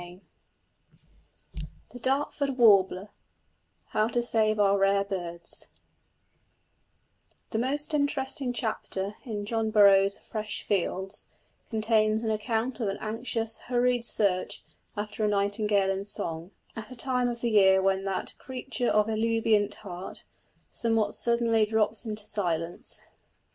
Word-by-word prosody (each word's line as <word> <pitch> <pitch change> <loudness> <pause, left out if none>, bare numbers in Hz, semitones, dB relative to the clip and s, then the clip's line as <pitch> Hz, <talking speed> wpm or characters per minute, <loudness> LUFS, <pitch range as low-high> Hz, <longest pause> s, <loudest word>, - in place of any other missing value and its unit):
CHAPTER 175 +2 -12
XII - - -18 0.2
THE 245 - -10
DARTFORD 275 +1 0
WARBLER 200 -4 +4 0.8
HOW 215 0 +1
TO 240 - -1
SAVE 215 -2 +1
OUR 200 -1 +4
RARE 195 0 +3
BIRDS 175 -4 -7 1.8
The 220 - -1
most 290 +5 0
interesting 280 -3 -1
chapter 215 -4 -3
in 210 -4 -4
John 225 0 -1
Burroughs' 200 -2 +5
Fresh 215 -2 -5
Fields 190 0 -2 0.4
contains 220 -1 +2
an 220 - 0
account 225 +3 -2
of 225 - -1
an 195 - -2
anxious 225 0 -3
hurried 245 -1 +1
search 190 -3 0 0.3
after 210 +1 -4
a - - +3
nightingale 205 -1 +1
in 195 +1 -3
song, 165 -4 -5 0.3
at 225 - -7
a 255 - -9
time 250 0 0
of 235 -1 -4
the 235 - 0
year 190 -2 +6
when 190 0 +1
that 195 -1 -3
"creature 255 -1 -3
of 210 0 +3
ebullient 225 -1 +1
heart" 180 0 -8 0.5
somewhat 225 -3 0
suddenly 235 -2 +2
drops 220 +1 0
into 215 -1 -5
silence. 175 -5 -2
215 Hz, 125 wpm, -28 LUFS, 200-235 Hz, 1.8 s, year